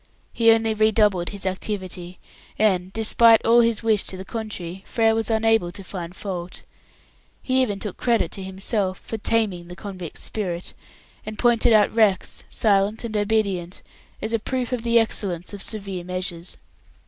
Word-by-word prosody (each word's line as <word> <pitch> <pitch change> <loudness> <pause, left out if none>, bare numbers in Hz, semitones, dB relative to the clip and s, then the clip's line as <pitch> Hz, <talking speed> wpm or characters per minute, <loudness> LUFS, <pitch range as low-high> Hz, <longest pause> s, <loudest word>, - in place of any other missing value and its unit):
He 230 -1 +4
only 225 0 +4
redoubled 210 -4 +2
his 200 -2 -7
activity, 185 -2 -4 0.4
and 190 -4 +2
despite 225 +1 +4
all 235 +1 +6
his 230 -1 +1
wish 220 -3 +3
to 190 - -6
the 190 - -7
contrary 190 -5 -6
Frere 225 -1 +2
was 225 0 0
unable 225 -5 +2
to 195 +2 -9
find 180 -2 -7
fault. 180 -3 -6 0.8
He 260 0 +2
even 205 -6 -1
took 210 -3 -6
credit 230 -8 +1
to 195 - -8
himself 190 0 -2
for 225 - -7
"taming" 200 -6 0
the 175 - -9
convict's 185 -5 -7
spirit, 180 -5 -4 0.5
and 215 0 -7
pointed 240 -1 +3
out 215 -2 +5
Rex 215 -4 +1
silent 205 +1 +1
and 225 -2 -5
obedient 200 -4 -1 0.4
as 220 +1 -2
a 230 - +2
proof 255 +2 -3
of 250 -2 -1
the 235 0 +3
excellence 195 -6 0
of 200 - -7
severe 195 -5 -5
measures. 180 -1 -4
205 Hz, 160 wpm, -23 LUFS, 185-225 Hz, 0.8 s, all